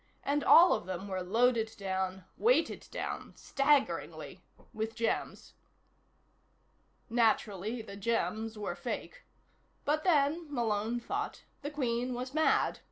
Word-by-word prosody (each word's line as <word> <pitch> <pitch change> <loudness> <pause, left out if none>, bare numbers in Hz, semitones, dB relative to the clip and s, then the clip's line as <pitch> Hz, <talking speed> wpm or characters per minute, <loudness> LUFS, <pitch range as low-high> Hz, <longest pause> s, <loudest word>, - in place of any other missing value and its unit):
And 285 +1 0
all 350 +2 +8
of 175 - -3
them 185 +1 -4
were 190 -1 -3
loaded 225 +3 +2
down, 190 -1 -3
weighted 485 +3 +2
down, - - -5
staggeringly, 275 0 0 0.3
with 220 +1 -3
gems. 230 - -2 1.5
Naturally, 220 -1 +1
the 200 -2 -9
gems 220 +1 -1
were 210 - -3
fake. - - -6 0.6
But 305 +2 +1
then, 310 -1 +2
Malone 230 -2 0
thought, 405 - -4 0.2
the 290 - -4
Queen 250 -3 -1
was 255 +2 -5
mad. 315 +1 +2
235 Hz, 115 wpm, -31 LUFS, 210-285 Hz, 1.5 s, all